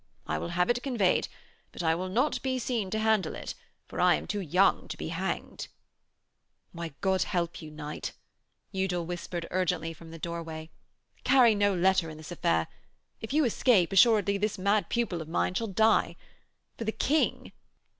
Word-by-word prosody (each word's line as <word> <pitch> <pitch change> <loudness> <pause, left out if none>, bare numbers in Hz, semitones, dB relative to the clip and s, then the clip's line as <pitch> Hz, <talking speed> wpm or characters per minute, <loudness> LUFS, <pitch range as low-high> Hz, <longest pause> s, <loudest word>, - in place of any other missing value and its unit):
I 80 - -2
will 85 - -4
have 180 - +3
it 240 0 -1
conveyed, 235 -10 +1 0.4
but - - -6
I 160 -1 +3
will 185 +3 -3
not 250 +10 +1
be 260 -1 -1
seen 235 -5 -2
to 220 - -2
handle 220 -2 +1
it, - - -6 0.3
for - - -4
I - - +6
am - - -5
too 205 - -2
young 185 +1 +2
to - - -6
be - - -5
hanged.' - - -4 1.0
'Why, 170 -4 -7
God 190 -1 +2
help 175 -3 -1
you, 155 - -8
knight,' 150 0 -6 0.6
Udal 185 -3 -1
whispered 175 0 -5
urgently 180 -3 0
from 165 +1 -13
the 165 - -9
doorway, 165 -1 -6 0.5
'carry 250 -4 +6
no 205 -1 +2
letter 185 -1 +2
in 155 - -9
this 155 +2 -10
affair 80 - +1 0.5
if 220 - -6
you 300 +1 +3
escape, 215 -6 +3
assuredly 205 -1 +5
this 210 0 -1
mad 200 +2 +1
pupil 230 -8 -1
of 160 - -8
mine 175 - 0
shall 225 +4 -1
die. 220 +3 +3 0.6
For - - -2
the 220 - -1
King 300 +7 0
185 Hz, 175 wpm, -29 LUFS, 170-220 Hz, 1.0 s, I